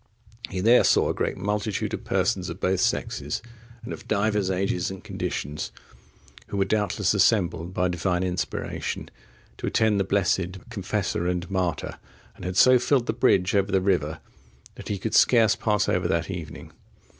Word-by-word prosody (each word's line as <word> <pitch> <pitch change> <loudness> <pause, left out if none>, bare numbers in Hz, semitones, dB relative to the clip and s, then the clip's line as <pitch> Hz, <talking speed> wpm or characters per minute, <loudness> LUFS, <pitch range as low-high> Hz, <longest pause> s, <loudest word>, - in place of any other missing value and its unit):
(53) 95 - -11
He 95 - -1
there 115 +5 +6
saw - - +3
a - - +1
great - - -2
multitude 105 +1 -2
of - - -4
persons 90 -2 0
of 85 +2 -7
both 95 0 +1
sexes, - - -1 0.4
and 115 - -6
of - - -10
divers 105 -2 +1
ages 95 -1 0
and 95 -1 -8
conditions, 75 +2 -4 0.8
who 100 - -4
were 95 - +2
doubtless 105 -1 +1
assembled 90 -4 +2
by 90 0 0
Divine 90 +1 -1
inspiration, 90 -1 -3 0.5
to - - -4
attend 110 -2 +2
the - - +3
blessed 95 -1 0
confessor 100 -4 -2
and 90 -1 -1
martyr, 90 -5 -2 0.4
and - - -10
had 90 0 -3
so 130 +3 +7
filled 125 0 +2
the 110 - -1
bridge 95 -5 +2
over 100 0 +2
the 95 - +3
river, 85 -5 0 0.5
that - - -11
he 100 - -2
could 110 +3 -4
scarce 115 -3 +5
pass 105 -3 +1
over 90 -1 +1
that 85 +1 -1
evening. 80 -6 -7
95 Hz, 170 wpm, -25 LUFS, 90-105 Hz, 0.8 s, so